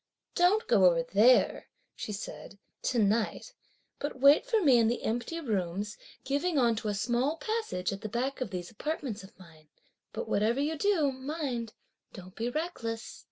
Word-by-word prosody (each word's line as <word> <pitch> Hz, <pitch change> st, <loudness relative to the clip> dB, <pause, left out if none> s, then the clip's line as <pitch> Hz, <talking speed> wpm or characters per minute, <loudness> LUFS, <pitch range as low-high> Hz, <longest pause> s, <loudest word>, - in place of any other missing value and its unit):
"Don't 370 Hz, +5 st, +3 dB
go 210 Hz, -6 st, +5 dB
over 170 Hz, -2 st, +4 dB
there," 215 Hz, +9 st, +4 dB, 0.3 s
she -, -, -5 dB
said, 200 Hz, -1 st, -7 dB, 0.2 s
"to 250 Hz, -, -1 dB
night, 220 Hz, -, 0 dB, 0.5 s
but 285 Hz, -2 st, -4 dB
wait 285 Hz, -, +6 dB
for 460 Hz, -3 st, +3 dB
me 275 Hz, -, +5 dB
in 225 Hz, -, +4 dB
the 240 Hz, +2 st, -1 dB
empty 240 Hz, +9 st, -2 dB
rooms 205 Hz, -, -2 dB, 0.3 s
giving 285 Hz, +5 st, 0 dB
on 235 Hz, -3 st, +3 dB
to 220 Hz, -, -4 dB
a 205 Hz, -, -1 dB
small 245 Hz, +8 st, 0 dB
passage 435 Hz, -, -2 dB
at 195 Hz, -, -7 dB
the 215 Hz, -, -5 dB
back 255 Hz, +5 st, -2 dB
of 255 Hz, -, -2 dB
these 180 Hz, -1 st, -6 dB
apartments 255 Hz, -3 st, -4 dB
of 190 Hz, -, -15 dB
mine. 160 Hz, -4 st, -17 dB, 0.4 s
But 480 Hz, -, -5 dB
whatever 220 Hz, +5 st, +1 dB
you 300 Hz, +3 st, 0 dB
do, 315 Hz, -4 st, +2 dB
mind 260 Hz, -4 st, -4 dB, 0.4 s
don't 185 Hz, -1 st, -11 dB
be 230 Hz, +2 st, -2 dB
reckless." 245 Hz, -7 st, -4 dB
240 Hz, 170 wpm, -30 LUFS, 205-295 Hz, 0.5 s, wait